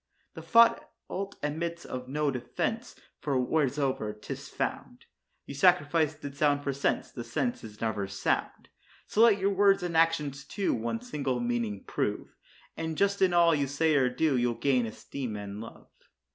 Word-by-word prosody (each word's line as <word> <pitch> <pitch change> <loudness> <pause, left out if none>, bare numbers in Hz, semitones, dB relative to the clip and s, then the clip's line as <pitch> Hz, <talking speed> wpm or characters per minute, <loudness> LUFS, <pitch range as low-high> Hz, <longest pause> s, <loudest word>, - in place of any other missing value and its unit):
The - - -8
fault 230 -4 +2
admits 170 +3 -3
of 125 0 -6
no 150 +1 0
defence, 135 - -3 0.2
for 140 -3 -1
wheresoe'er 135 -5 0
'tis - - -7
found, - - -4 0.4
You - - -7
sacrifice 155 0 +3
the 145 -2 -8
sound 145 0 +2
for 140 - -1
sense; 140 - -1
the 120 - -6
sense 125 - -2
is 105 -1 -10
never 110 -3 -1
sound. 100 0 -2 0.4
So 215 - +1
let 230 -3 +7
your 200 +1 +1
words 195 -1 +4
and 175 -2 -3
actions, 150 -4 +2
too, 200 -2 -1
one 120 - -2
single 140 - -2
meaning 120 -4 -2
prove, - - -3 0.4
And 160 -1 -4
just 200 0 +1
in 190 -1 +5
all 170 -1 +5
you 145 -2 +1
say 155 +3 +1
or 135 -3 +3
do, 140 +3 +1
you'll 120 -1 +1
gain 125 -1 +1
esteem 120 +1 -6
and 105 0 -6
love. 115 - -12
145 Hz, 165 wpm, -29 LUFS, 125-170 Hz, 0.4 s, let